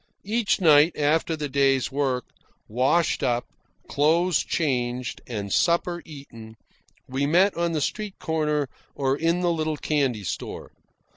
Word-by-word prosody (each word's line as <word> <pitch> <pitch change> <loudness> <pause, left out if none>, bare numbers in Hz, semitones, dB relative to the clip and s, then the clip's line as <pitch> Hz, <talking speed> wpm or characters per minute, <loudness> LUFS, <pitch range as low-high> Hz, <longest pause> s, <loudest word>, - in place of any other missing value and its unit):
Each 220 +1 +1
night, 155 -2 +5
after 155 +2 +1
the 150 -1 -4
day's 135 -1 +1
work, 135 -3 -1 0.4
washed 130 +9 +1
up, 120 -2 0 0.4
clothes 165 +4 +2
changed, 125 -5 -2
and 100 -5 -4
supper 175 0 +1
eaten, 115 -7 -11 0.5
we 135 +2 -1
met 185 +6 +3
on 170 0 -1
the 155 - -1
street 210 +5 -3
corner 150 -3 -1 0.3
or 135 -1 0
in 165 +4 0
the 175 -1 +2
little 155 -1 -2
candy 135 -9 0
store. 85 - -6
150 Hz, 135 wpm, -25 LUFS, 130-170 Hz, 0.5 s, night